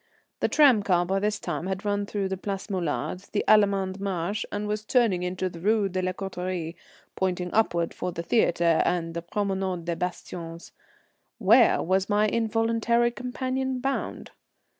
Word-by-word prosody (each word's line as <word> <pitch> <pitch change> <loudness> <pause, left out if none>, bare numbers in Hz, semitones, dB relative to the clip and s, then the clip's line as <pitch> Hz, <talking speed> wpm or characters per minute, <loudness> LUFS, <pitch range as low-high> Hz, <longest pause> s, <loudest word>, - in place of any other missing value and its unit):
The - - +2
tram 270 -8 +5
car 180 -3 +2
by 195 +2 0
this 210 +1 -1
time 180 - -4
had 190 +2 -4
run 205 0 0
through 200 -2 -2
the 190 - -1
Place 195 +2 -5
Molard, 185 +1 -3
the 205 - +1
Allemand 200 -2 +3
Marché, 195 +1 -2
and 205 0 -3
was 210 0 -2
turning 220 -6 +2
into 180 +1 -2
the 170 -2 -8
Rue 205 +2 +2
de 185 0 -2
la 185 0 0
Corraterie, 180 -3 -4 0.4
pointing 180 -1 -1
upward 170 -6 +1
for 180 - -3
the 170 0 -5
theatre 170 -5 +3
and 165 -2 -1
the 170 - -3
Promenade 190 -1 -2
des 170 0 -1
Bastions. 170 -1 -6 0.7
Where 230 +3 +5
was 190 +3 +1
my 210 0 +3
involuntary 230 +1 +1
companion 255 +1 -3
bound? 270 +2 -3
195 Hz, 160 wpm, -26 LUFS, 180-215 Hz, 0.7 s, tram